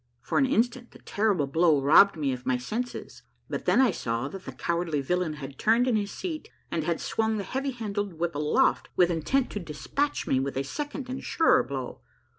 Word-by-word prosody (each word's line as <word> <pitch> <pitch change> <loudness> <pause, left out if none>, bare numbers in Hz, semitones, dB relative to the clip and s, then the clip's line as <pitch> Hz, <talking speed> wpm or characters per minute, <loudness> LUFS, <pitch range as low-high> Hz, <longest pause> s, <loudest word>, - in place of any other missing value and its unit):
For - - 0
an 270 - +3
instant 245 -1 0
the - - -15
terrible 200 -8 0
blow 160 +1 +3
robbed 160 +7 +6
me 140 -4 0
of 125 -1 -7
my 130 -1 +1
senses, 225 - -5 0.3
but - - -4
then - - +4
I 260 -3 +5
saw 115 +2 -2
that 195 +3 -9
the - - -6
cowardly 170 -3 -1
villain 175 +3 -1
had 140 -2 -9
turned 230 +3 +3
in 245 - +2
his 205 -1 0
seat 325 - -5 0.2
and 160 - -1
had 170 +1 -1
swung 220 0 0
the 200 - -2
heavy 265 +8 -2
handled 205 -6 -3
whip 170 +1 -2
aloft 150 +1 +1
with 180 -1 +4
intent 240 - 0
to 210 - -3
de 165 -5 -8
spatch 285 - -2
me 130 - +2
with 135 0 -3
a 135 - 0
second 290 - -5
and 260 +1 -4
a - - -10
surer 325 - +3
blow. 130 - -6
180 Hz, 220 wpm, -27 LUFS, 150-240 Hz, 0.3 s, robbed